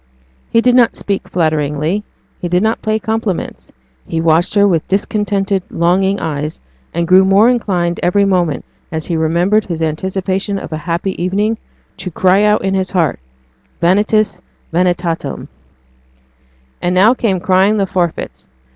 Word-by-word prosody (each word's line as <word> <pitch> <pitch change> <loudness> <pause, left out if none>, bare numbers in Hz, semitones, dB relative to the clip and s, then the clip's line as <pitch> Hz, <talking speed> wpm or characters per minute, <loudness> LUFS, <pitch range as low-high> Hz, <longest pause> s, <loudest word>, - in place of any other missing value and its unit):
He 230 - +3
did 250 +1 +3
not 245 -2 +4
speak 200 -1 -3
flatteringly 155 +3 0 0.4
he 175 - -3
did 180 +3 +1
not 220 +1 0
pay 215 0 0
compliments 220 -3 -3 0.4
he 165 - -2
watched 165 +3 +2
her 205 0 +5
with 170 -5 0
discontented, 200 -1 0
longing 190 +4 +1
eyes, 150 0 -3 0.3
and 170 0 -2
grew 185 +2 +6
more 200 +5 +5
inclined 180 -8 -1
every 200 +3 +2
moment, 175 -7 0 0.3
as 160 -1 -3
he 170 - -2
remembered 175 +7 +2
his 165 -3 -3
anticipation 190 +5 -2
of 180 - -7
a - - -2
happy 170 +2 -2
evening, 210 +5 0 0.4
to 185 - -5
cry 185 +3 +3
out 210 0 +3
in 195 - 0
his 190 -1 0
heart 170 - 0 0.6
vanitas 205 +1 +2 0.3
vanitatum. 175 -1 -1 1.3
And 180 +1 0
now 205 +6 +6
came 210 -7 0
crying 190 +3 +3
the 200 - +1
forfeits. 175 -3 -3
185 Hz, 145 wpm, -15 LUFS, 170-205 Hz, 1.3 s, grew